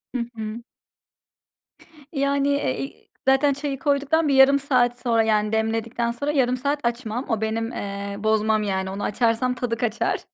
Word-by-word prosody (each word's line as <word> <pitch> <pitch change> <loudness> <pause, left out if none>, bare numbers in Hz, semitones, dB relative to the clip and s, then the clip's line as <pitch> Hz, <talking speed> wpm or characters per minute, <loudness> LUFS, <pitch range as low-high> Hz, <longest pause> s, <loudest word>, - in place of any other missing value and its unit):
Hı 245 - 0
hı. 220 +1 -5 1.5
Yani, 280 -1 +1
eee, 280 - 0
iii, 135 +1 -8 0.2
zaten 270 +1 +4
çayı 280 -1 -4
koyduktan 290 +3 +1
bir 280 - +2
yarım 270 +1 +6
saat 245 -3 +1
sonra, 230 -3 +2
yani, 215 -1 +1
demledikten 225 +2 0
sonra 285 +5 -2
yarım 255 -3 +2
saat 280 +3 -1
açmam. 235 +1 -2
O 225 -3 0
benim, 225 +2 -1
eee, 200 -1 -5
bozmam 215 0 +2
yani. 190 -2 -1
Onu 200 +1 -5
açarsam 230 +3 +1
tadı 235 -2 -2
kaçar. 245 - -1
235 Hz, 155 wpm, -23 LUFS, 220-275 Hz, 1.5 s, yarım